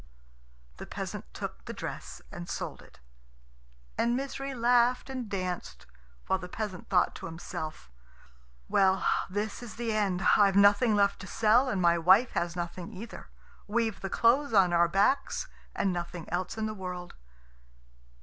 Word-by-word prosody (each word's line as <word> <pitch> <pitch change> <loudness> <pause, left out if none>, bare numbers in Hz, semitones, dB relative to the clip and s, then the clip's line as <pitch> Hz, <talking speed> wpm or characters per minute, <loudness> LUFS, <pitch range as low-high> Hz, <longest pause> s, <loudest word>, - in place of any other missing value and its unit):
The - - -8
peasant - - -6
took - - -7
the - - -6
dress - - -7
and 85 - -8
sold - - -4
it; - - -18 1.0
and 235 +1 +2
Misery 275 0 -4
laughed 245 +2 +3
and 255 -4 -5
danced, 180 - -4 0.4
while 190 - +1
the 180 -1 -8
peasant 200 -2 -5
thought 180 -2 +3
to - - -7
himself, 155 - -7 0.8
"Well, 190 0 +3 0.2
this 205 +4 -3
is 240 -3 -8
the 230 -1 -2
end. 195 -4 0
I've 200 -2 +4
nothing 205 +3 +5
left 200 -1 +2
to 195 - -8
sell, 230 +6 +3
and 195 - -1
my 170 -1 +4
wife 190 +9 +5
has 170 0 -2
nothing 175 +2 -5
either. 220 +3 -9 0.4
We've 225 0 0
the 195 - -3
clothes 240 +6 +3
on 190 -4 +5
our 170 0 +5
backs, 205 - +1 0.3
and 195 -2 +1
nothing 175 -1 -5
else 180 +5 -2
in 220 - -1
the 215 - -2
world." 180 -3 -6
200 Hz, 155 wpm, -29 LUFS, 180-230 Hz, 1.0 s, nothing